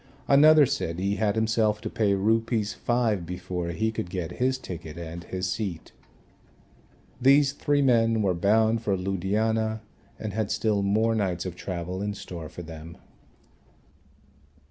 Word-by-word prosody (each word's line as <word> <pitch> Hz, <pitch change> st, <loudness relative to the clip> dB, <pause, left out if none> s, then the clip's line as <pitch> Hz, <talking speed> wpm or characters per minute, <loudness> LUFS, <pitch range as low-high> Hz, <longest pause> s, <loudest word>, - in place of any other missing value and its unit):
Another 150 Hz, +2 st, +7 dB
said 85 Hz, -8 st, -2 dB
he 100 Hz, +2 st, -1 dB
had 105 Hz, -1 st, +1 dB
himself 110 Hz, -1 st, +1 dB
to -, -, -4 dB
pay 105 Hz, -4 st, +1 dB
Rs. 110 Hz, +1 st, +1 dB
5 115 Hz, -6 st, 0 dB
before 90 Hz, 0 st, -4 dB
he 110 Hz, +6 st, -1 dB
could 100 Hz, -5 st, -4 dB
get 90 Hz, -2 st, -4 dB
his 130 Hz, +1 st, +2 dB
ticket 85 Hz, -9 st, -8 dB
and 85 Hz, 0 st, -7 dB
his 95 Hz, 0 st, -3 dB
seat. 90 Hz, -4 st, -4 dB, 1.3 s
These 135 Hz, +2 st, +5 dB
three 145 Hz, 0 st, +1 dB
men 115 Hz, -4 st, +3 dB
were 95 Hz, -2 st, +2 dB
bound 110 Hz, +5 st, +2 dB
for 100 Hz, -4 st, 0 dB
Ludhiana 110 Hz, +4 st, -1 dB, 0.4 s
and 110 Hz, -2 st, -5 dB
had 110 Hz, -1 st, -1 dB
still 105 Hz, -3 st, +1 dB
more 110 Hz, +3 st, +2 dB
nights 95 Hz, -5 st, -1 dB
of 90 Hz, -2 st, -5 dB
travel 90 Hz, +1 st, -5 dB
in 105 Hz, 0 st, -3 dB
store 85 Hz, -5 st, -8 dB
for 90 Hz, -, -9 dB
them. 80 Hz, 0 st, -10 dB
105 Hz, 145 wpm, -26 LUFS, 90-115 Hz, 1.3 s, Another